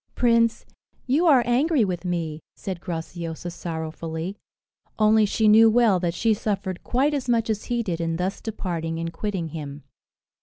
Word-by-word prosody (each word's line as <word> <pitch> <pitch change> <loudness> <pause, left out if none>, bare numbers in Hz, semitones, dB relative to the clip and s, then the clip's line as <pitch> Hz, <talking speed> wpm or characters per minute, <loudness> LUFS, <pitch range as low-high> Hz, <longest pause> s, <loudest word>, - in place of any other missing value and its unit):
"Prince, 230 -1 +2 0.4
you 295 +7 +2
are 270 -6 +6
angry 260 +1 +2
with 180 -2 -4
me," 165 -3 -2 0.2
said 185 -3 -6
Graciosa 170 0 -5
sorrowfully; 160 +1 -5 0.6
only 215 0 +4
she 220 +2 +1
knew 220 +1 +7
well 220 -4 +4
that 170 -1 -1
she 225 +3 +2
suffered 200 -4 -3
quite 275 +4 +1
as 270 -4 -2
much 230 -2 +2
as 210 -1 -3
he 240 -1 -1
did 170 -5 -3
in 165 0 -1
thus 180 +3 -2
departing 170 -7 -3
and 165 0 -4
quitting 190 -3 -3
him. 145 -2 -7
195 Hz, 160 wpm, -24 LUFS, 165-230 Hz, 0.6 s, knew